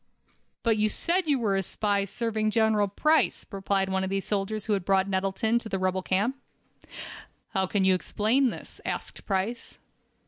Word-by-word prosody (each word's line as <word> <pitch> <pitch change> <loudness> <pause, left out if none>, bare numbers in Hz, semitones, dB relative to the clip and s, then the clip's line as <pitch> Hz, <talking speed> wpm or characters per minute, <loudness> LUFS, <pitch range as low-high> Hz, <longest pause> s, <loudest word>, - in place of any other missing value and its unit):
"But 225 -2 +3
you 215 0 +2
said 350 - 0
you 290 -2 +3
were 215 -5 +1
a 195 - +2
spy, 200 +1 0
serving 215 +1 -1
General 215 -1 +3
Price," 305 +11 +2
replied 195 -1 0
one 190 0 0
of 190 - -2
the 195 0 0
soldiers 205 +1 -2
who 215 - +1
had 195 -3 0
brought 190 +1 +2
Nettleton 195 +4 +1
to 230 - -8
the 195 - -1
rebel 185 0 0
camp. 205 +9 0 1.1
"How 190 -3 0
can 195 0 +1
you 190 - +5
explain 220 +8 +1
this?" - - -9
asked - - -5
Price. 200 +4 -2
205 Hz, 175 wpm, -27 LUFS, 190-225 Hz, 1.1 s, you